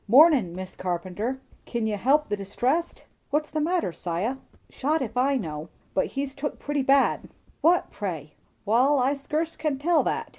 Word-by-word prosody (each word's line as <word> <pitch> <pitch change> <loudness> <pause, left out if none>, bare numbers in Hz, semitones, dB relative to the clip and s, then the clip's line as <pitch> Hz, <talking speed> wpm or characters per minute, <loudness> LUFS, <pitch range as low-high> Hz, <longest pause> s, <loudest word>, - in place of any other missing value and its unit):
"Mornin', 255 - +6
Mis' 185 0 -7
Carpenter. 185 +8 -3 0.3
Kin 235 -2 -2
you 215 -1 0
help 280 +9 +3
the 205 - -1
distressed?" 250 - -1 0.2
"What's 300 +1 0
the 310 +1 -1
matter, 335 - 0
'Siah?" 180 +12 -2 0.3
"Shot 305 +4 0
if 240 -5 -4
I 270 +2 +3
know; 155 -6 -5 0.2
but 190 - +1
he's 275 -1 -1
took 290 +1 -4
pretty 290 -1 -1
bad." 270 +1 +3 0.3
"Who, 345 +2 +6
pray?" 165 -7 -5 0.3
"Wall, 255 +7 +4
I 265 +2 +2
skurce 305 +4 -2
can 305 -3 -1
tell 320 +3 +3
that. - - -1
265 Hz, 170 wpm, -26 LUFS, 200-295 Hz, 0.3 s, Mornin